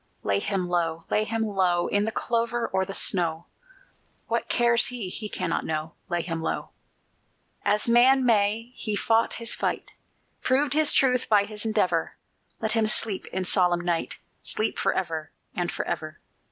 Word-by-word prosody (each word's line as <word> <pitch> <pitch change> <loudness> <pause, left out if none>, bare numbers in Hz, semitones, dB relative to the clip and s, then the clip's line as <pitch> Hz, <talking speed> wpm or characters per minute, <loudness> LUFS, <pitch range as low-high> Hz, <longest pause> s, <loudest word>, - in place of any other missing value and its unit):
Lay 100 0 +1
him 190 - -2
low, 165 -2 -1
lay 215 - +2
him 225 +1 -1
low, 185 -4 +1
In 205 +1 +1
the 220 - -2
clover 235 +1 -1
or 190 0 0
the 195 +1 -6
snow! 170 -3 +2 0.8
What - - -2
cares 235 0 +4
he? 240 -7 -3
he 210 +3 -5
cannot 185 - -2
know: 160 +1 -3 0.2
Lay 175 -1 -1
him 165 -2 -4
low! 160 - -3 0.9
As 210 +2 +1
man 255 +3 +5
may, 220 +1 +1
he 215 -4 -3
fought 225 +2 +2
his 230 -1 -1
fight, - - -2 0.5
Proved 275 +2 +2
his 305 0 +4
truth 250 -2 +2
by 210 -2 +5
his 210 +1 -5
endeavor; 185 -7 0 0.4
Let 220 -1 -1
him 225 -1 +2
sleep 215 -2 +2
in 190 0 -3
solemn 180 -2 +2
night, 175 -1 -1 0.3
Sleep 215 - -1
forever 160 -4 -1 0.3
and 175 -1 -1
forever. 155 0 -4
205 Hz, 160 wpm, -26 LUFS, 175-230 Hz, 0.9 s, man